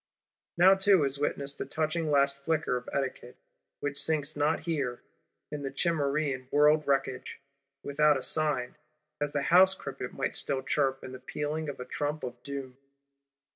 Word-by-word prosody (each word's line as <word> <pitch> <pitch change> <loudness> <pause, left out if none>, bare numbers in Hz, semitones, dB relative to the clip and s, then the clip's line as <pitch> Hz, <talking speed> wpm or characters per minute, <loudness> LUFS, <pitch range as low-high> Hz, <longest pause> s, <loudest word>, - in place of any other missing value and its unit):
Now 185 +3 +8
too 195 -3 +4
is 140 0 +1
witnessed 140 -1 -2
the - - -2
touching 155 0 -1
last 140 -1 +3
flicker 155 -4 0
of 125 0 -5
Etiquette; 130 -2 -3 0.4
which 145 -1 -1
sinks 155 -3 0
not 145 +1 +1
here, 140 -7 -2 0.5
in 150 -1 -4
the 135 - -3
Cimmerian 140 -4 0
World 150 +2 +4
wreckage, 135 -2 -1 0.4
without 150 +1 +3
a 130 - -6
sign, 150 -4 +1 0.4
as 145 0 -1
the 145 -1 -1
house 190 +1 +7
cricket - - -6
might - - -2
still 135 -1 -2
chirp 135 -3 0
in 130 - -7
the 130 - -8
pealing 150 +3 -3
of 140 - -7
a 125 - -5
Trump 145 +3 -3
of 125 -1 -6
Doom. 135 -2 -7
145 Hz, 165 wpm, -29 LUFS, 135-155 Hz, 0.5 s, Now